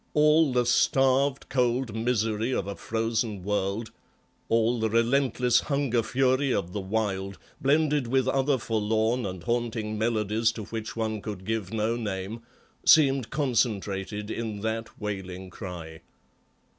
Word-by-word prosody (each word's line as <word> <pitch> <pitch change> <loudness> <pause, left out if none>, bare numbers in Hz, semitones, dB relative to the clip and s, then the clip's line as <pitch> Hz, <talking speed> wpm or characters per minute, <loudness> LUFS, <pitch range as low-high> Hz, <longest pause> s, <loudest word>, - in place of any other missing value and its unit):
All 150 0 +5
the 125 -1 +2
starved, 135 +3 +2
cold 125 -2 0
misery 115 0 0
of - - -1
a 100 0 -5
frozen 110 -3 -2
world, 105 +2 -1 0.6
all 115 +1 +2
the 110 0 +1
relentless 125 +1 +2
hunger 140 -5 0
fury 130 +3 +1
of 90 -5 -1
the 105 - -2
wild, 95 -1 -2 0.2
blended 145 -1 +2
with 130 +1 +1
other 135 +1 +2
forlorn 110 +1 0
and 90 -2 -7
haunting 115 -1 -2
melodies 110 0 +1
to 110 - -6
which 110 +1 -6
one 110 -2 -2
could 100 -3 -6
give 110 -3 -2
no 110 +1 0
name, 105 0 -4 0.4
seemed 135 -6 +5
concentrated 105 -6 -1
in 110 -3 -4
that 110 +1 -4
wailing 95 -3 -5
cry. 85 -5 -8
115 Hz, 130 wpm, -27 LUFS, 105-125 Hz, 0.6 s, All